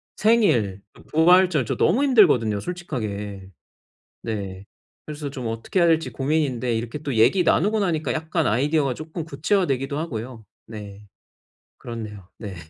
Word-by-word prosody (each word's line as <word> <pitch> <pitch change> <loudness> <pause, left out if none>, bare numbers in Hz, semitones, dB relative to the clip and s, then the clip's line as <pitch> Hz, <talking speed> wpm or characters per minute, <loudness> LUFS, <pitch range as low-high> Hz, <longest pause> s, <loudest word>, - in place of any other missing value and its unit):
생일, 125 - +2
그 - - -17
부활절 170 -2 +4
저 - - -2
너무 270 - +3
힘들거든요 145 - +4
솔직하게. 105 - -5 0.8
네. 100 -4 -5 0.4
그래서 150 -1 -6
좀 130 -3 -7
어떻게 115 +11 -2
해야 170 - +5
할지 160 -1 +2
고민인데 135 -4 0
이렇게 115 +5 -4
또 140 -2 -4
얘기 125 - +4
나누고 210 +7 +2
나니까 165 -5 0
약간 160 -1 -1
아이디어가 135 +3 +1
쪼끔 160 +1 -6
구체화되기도 145 -3 0
하고요. 120 -6 -6 0.2
네. 105 -2 -10 0.7
그렇네요. 110 -5 -8
네. 100 -4 -7
135 Hz, 330 characters per minute, -23 LUFS, 110-165 Hz, 0.8 s, 해야